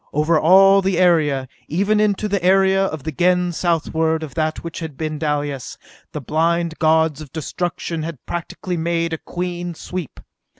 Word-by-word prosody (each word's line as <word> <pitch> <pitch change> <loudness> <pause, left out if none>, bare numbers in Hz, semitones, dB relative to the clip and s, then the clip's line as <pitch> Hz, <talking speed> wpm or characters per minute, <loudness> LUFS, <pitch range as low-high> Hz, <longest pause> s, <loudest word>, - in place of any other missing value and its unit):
Over 155 +2 +2
all 195 +4 +6
the 190 -2 0
area, 160 -6 +3
and 130 - -11 0.2
even 200 +6 +1
into 210 0 +1
the 200 -3 -1
area 190 +1 +4
of 155 -7 -5
the 160 - -3
Gens 180 +2 +1
southward 160 -1 0
of 145 -4 -7
that 155 -1 -2
which 170 -1 -6
had 160 -4 -7
been 155 -1 -3
Dalis, 145 -4 -3 0.3
the - - -5
blind 165 +3 0
gods 160 -2 +2
of 145 -4 -10
destruction 165 +1 -4
had 155 -4 -7
practically 175 +1 -4
made 165 0 -1
a 160 - -3
clean 175 -1 -5
sweep. 175 -2 -6
165 Hz, 170 wpm, -20 LUFS, 155-180 Hz, 0.3 s, all